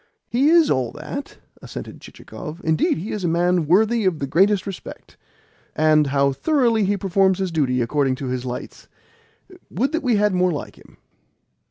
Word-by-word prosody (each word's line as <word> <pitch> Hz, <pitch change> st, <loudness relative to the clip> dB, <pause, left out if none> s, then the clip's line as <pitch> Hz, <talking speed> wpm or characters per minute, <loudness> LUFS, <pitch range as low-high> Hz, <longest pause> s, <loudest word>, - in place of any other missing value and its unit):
"He 260 Hz, +5 st, +3 dB
is 330 Hz, -2 st, +5 dB
all 130 Hz, -3 st, 0 dB
that," 270 Hz, -, -7 dB, 0.2 s
assented -, -, -9 dB
Chichikov. 165 Hz, 0 st, -10 dB
"Indeed, 160 Hz, -1 st, +1 dB
he 180 Hz, +7 st, -5 dB
is 210 Hz, -, -4 dB
a -, -, +1 dB
man 175 Hz, -1 st, +1 dB
worthy 220 Hz, +6 st, +3 dB
of 185 Hz, -4 st, +1 dB
the 140 Hz, -, -3 dB
greatest 185 Hz, +7 st, +2 dB
respect. 195 Hz, -3 st, -9 dB, 0.6 s
And 155 Hz, -1 st, +3 dB
how 140 Hz, 0 st, +2 dB
thoroughly 235 Hz, -, +1 dB
he 200 Hz, +1 st, 0 dB
performs 190 Hz, 0 st, +2 dB
his 190 Hz, -2 st, -2 dB
duty 130 Hz, -6 st, 0 dB
according 135 Hz, +1 st, 0 dB
to 135 Hz, +1 st, -7 dB
his 125 Hz, -1 st, -3 dB
lights! 125 Hz, -1 st, -7 dB, 0.8 s
Would 255 Hz, -, -1 dB
that 325 Hz, +1 st, -1 dB
we 250 Hz, -4 st, +1 dB
had 210 Hz, -1 st, +2 dB
more 180 Hz, 0 st, +2 dB
like 150 Hz, -, -6 dB
him!" -, -, -20 dB
180 Hz, 175 wpm, -21 LUFS, 150-210 Hz, 0.8 s, is